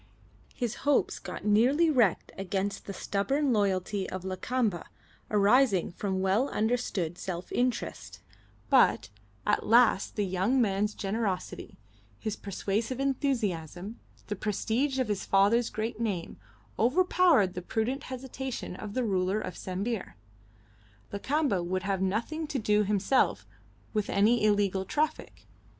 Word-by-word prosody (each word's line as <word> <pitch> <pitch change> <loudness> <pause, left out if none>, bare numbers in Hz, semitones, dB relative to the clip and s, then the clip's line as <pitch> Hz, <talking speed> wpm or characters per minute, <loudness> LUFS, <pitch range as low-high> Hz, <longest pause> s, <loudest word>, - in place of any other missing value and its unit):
His 240 -3 -3
hopes 290 +1 +1
got - - -7
nearly 250 +11 +4
wrecked 235 - +2
against 195 +1 -3
the - - -4
stubborn 270 +9 0
loyalty 195 -1 0
of 185 -1 -5
Lakamba 190 +1 -1 0.4
arising 210 -1 +3
from 190 +1 -2
well 200 +9 +2
understood 210 -7 -1
self 180 -1 -5
interest; 245 -1 -2 0.5
but - - +4 0.4
at 210 - +1
last 230 -3 +4
the 210 - 0
young 190 +8 +1
man's 210 -2 +1
generosity, 200 -2 -3 0.4
his 215 -2 -3
persuasive 210 +5 -3
enthusiasm, 220 - -2 0.3
the 210 - -3
prestige 225 +7 -1
of 260 - +1
his 205 -2 -2
father's 205 +5 +3
great 220 +1 -4
name, 200 -7 -3 0.4
overpowered 290 - +4
the 180 - -5
prudent 235 +9 -2
hesitation 260 -4 -5
of 205 +2 -7
the 255 - +1
ruler 190 -1 +1
of 185 - -5
Sambir. 195 +3 -4 1.0
Lakamba 260 - 0
would 185 +2 -2
have 195 -1 -1
nothing 235 +12 -1
to 285 - -2
do 210 -3 +2
himself 205 +5 +1 0.5
with 210 -2 -1
any 215 +4 +3
illegal 205 -2 +2
traffic. 300 +10 -2
210 Hz, 125 wpm, -29 LUFS, 195-250 Hz, 1.0 s, nearly